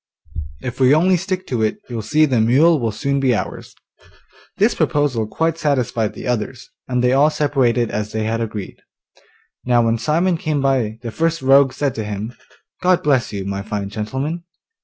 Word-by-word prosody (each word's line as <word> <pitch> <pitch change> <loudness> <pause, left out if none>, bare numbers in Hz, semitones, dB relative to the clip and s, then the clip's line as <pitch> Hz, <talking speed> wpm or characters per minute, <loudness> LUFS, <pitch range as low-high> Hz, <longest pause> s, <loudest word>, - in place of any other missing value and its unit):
If 125 0 -5
we 130 +2 +5
only 180 +4 +4
stick 185 +1 -3
to 125 -8 -2
it 110 -1 0
you'll 120 -3 -4
see 155 +8 +3
the 130 -6 +1
mule 145 +8 +4
will 115 -3 -1
soon 140 +6 -1
be 130 -3 +2
ours.' - - -5 0.8
This - - +3
proposal 135 -7 0
quite 165 +7 -1
satisfied 125 -7 0
the - - -8
others, 125 +1 -3 0.2
and 125 -1 0
they 125 +1 +3
all 140 +3 +5
separated 130 -6 +1
as 105 0 -3
they 110 -1 -2
had 115 +1 -1
agreed. 105 -3 -5 0.9
Now 120 -1 +3
when 115 0 +1
Simon 165 +8 +1
came 155 -2 -1
by, 130 -6 0
the 115 - -4
first 165 +2 -1
rogue 135 0 +5
said 140 -2 -1
to 110 - -4
him, 105 +3 -5 0.5
'God 185 -1 +3
bless 135 -4 +2
you, 100 -2 -4
my 100 0 -3
fine 100 -1 -4
gentleman. 130 +11 -4
125 Hz, 180 wpm, -19 LUFS, 110-150 Hz, 0.9 s, we